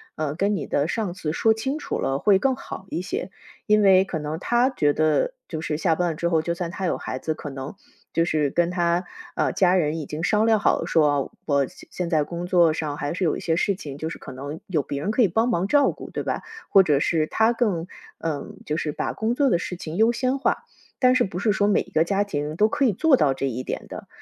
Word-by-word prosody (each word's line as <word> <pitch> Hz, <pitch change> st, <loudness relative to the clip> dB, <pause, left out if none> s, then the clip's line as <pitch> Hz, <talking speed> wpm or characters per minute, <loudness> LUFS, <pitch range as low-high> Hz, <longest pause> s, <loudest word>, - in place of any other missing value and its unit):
呃， 150 Hz, -2 st, -2 dB
跟 200 Hz, +5 st, 0 dB
你 170 Hz, -, -3 dB
的 145 Hz, +2 st, 0 dB
上 205 Hz, -2 st, -2 dB
司 165 Hz, -4 st, -3 dB
说 220 Hz, +7 st, +3 dB
清 265 Hz, +7 st, -3 dB
楚 310 Hz, -, -4 dB
了 135 Hz, -, 0 dB
会 195 Hz, +6 st, +4 dB
更 265 Hz, +2 st, +1 dB
好 190 Hz, -, -9 dB
一 -, -, -2 dB
些。 180 Hz, +1 st, -4 dB, 0.4 s
因 210 Hz, 0 st, +4 dB
为 190 Hz, -1 st, +6 dB
可 180 Hz, -, -4 dB
能 155 Hz, +1 st, -4 dB
他 240 Hz, +6 st, +2 dB
觉 150 Hz, -, +2 dB
得 155 Hz, -, +1 dB
就 160 Hz, -2 st, -5 dB
是 150 Hz, -2 st, -2 dB
下 165 Hz, +1 st, +2 dB
班 175 Hz, +1 st, 0 dB
了 -, -, -5 dB
之 170 Hz, +2 st, -1 dB
后 165 Hz, -2 st, +2 dB
就 170 Hz, +2 st, -2 dB
算 170 Hz, -1 st, -4 dB
他 190 Hz, +1 st, -4 dB
有 -, -, 0 dB
孩 130 Hz, -, -5 dB
子， 155 Hz, +4 st, -2 dB
可 150 Hz, -, -7 dB
能 135 Hz, +3 st, -7 dB, 0.4 s
就 165 Hz, -, +3 dB
是 155 Hz, -4 st, +1 dB
跟 170 Hz, +4 st, +1 dB
他， 175 Hz, 0 st, +1 dB, 0.3 s
呃， -, -, +1 dB
家 185 Hz, -1 st, +3 dB
人 160 Hz, -3 st, +1 dB
已 155 Hz, -, -4 dB
经 150 Hz, +3 st, -5 dB
商 210 Hz, +3 st, +3 dB
量 225 Hz, -1 st, +4 dB
好 -, -, +2 dB
了 -, -, -3 dB
说， 145 Hz, -4 st, +2 dB
我 140 Hz, -3 st, +2 dB
现 -, -, -16 dB
现 180 Hz, -2 st, -3 dB
在 155 Hz, -3 st, +2 dB
工 170 Hz, +3 st, -5 dB
作 175 Hz, -3 st, +4 dB
上 155 Hz, -2 st, -3 dB
还 145 Hz, +1 st, -3 dB
是 185 Hz, +1 st, -1 dB
有 155 Hz, -, +1 dB
一 -, -, -5 dB
些 165 Hz, -1 st, 0 dB
事 200 Hz, +2 st, +1 dB
情 145 Hz, -6 st, -8 dB
就 160 Hz, -, -4 dB
是 -, -, -7 dB
可 -, -, -9 dB
能 140 Hz, +4 st, -7 dB
有 165 Hz, -6 st, +1 dB
别 140 Hz, 0 st, -4 dB
人 205 Hz, -, -1 dB
可 245 Hz, -, +2 dB
以 215 Hz, -, +6 dB
帮 225 Hz, +7 st, +1 dB
忙 190 Hz, -4 st, 0 dB
照 285 Hz, +4 st, +4 dB
顾， -, -, -10 dB
对 -, -, -3 dB
吧？ -, -, -3 dB, 0.3 s
或 195 Hz, -, +7 dB
者 145 Hz, -4 st, +2 dB
是， 155 Hz, -1 st, +1 dB
他 220 Hz, +6 st, +3 dB
更， 200 Hz, -8 st, 0 dB, 0.3 s
呃， 155 Hz, -4 st, -3 dB, 0.2 s
就 150 Hz, -, -2 dB
是 155 Hz, -3 st, -2 dB
把 -, -, -2 dB
工 220 Hz, +2 st, -1 dB
作 280 Hz, -1 st, +3 dB
的 175 Hz, -, +3 dB
事 180 Hz, +1 st, -5 dB
情 170 Hz, 0 st, -6 dB
优 225 Hz, +2 st, +5 dB
先 255 Hz, +3 st, 0 dB
化。 275 Hz, -, -17 dB, 0.5 s
但 255 Hz, -1 st, +4 dB
是 255 Hz, -, +3 dB
不 180 Hz, -2 st, -5 dB
是 210 Hz, +2 st, +2 dB
说 200 Hz, 0 st, +2 dB
每 205 Hz, -, +3 dB
一 -, -, -10 dB
个 160 Hz, +1 st, +3 dB
家 200 Hz, +3 st, +1 dB
庭 150 Hz, -5 st, -3 dB
都 210 Hz, +5 st, +3 dB
可 275 Hz, +4 st, +1 dB
以 225 Hz, -, +3 dB
做 280 Hz, -, +4 dB
到 140 Hz, -, +3 dB
这 135 Hz, +1 st, -2 dB
一 125 Hz, +1 st, -4 dB
点 -, -, -5 dB
的。 -, -, -8 dB
170 Hz, 285 characters per minute, -24 LUFS, 155-210 Hz, 0.5 s, 或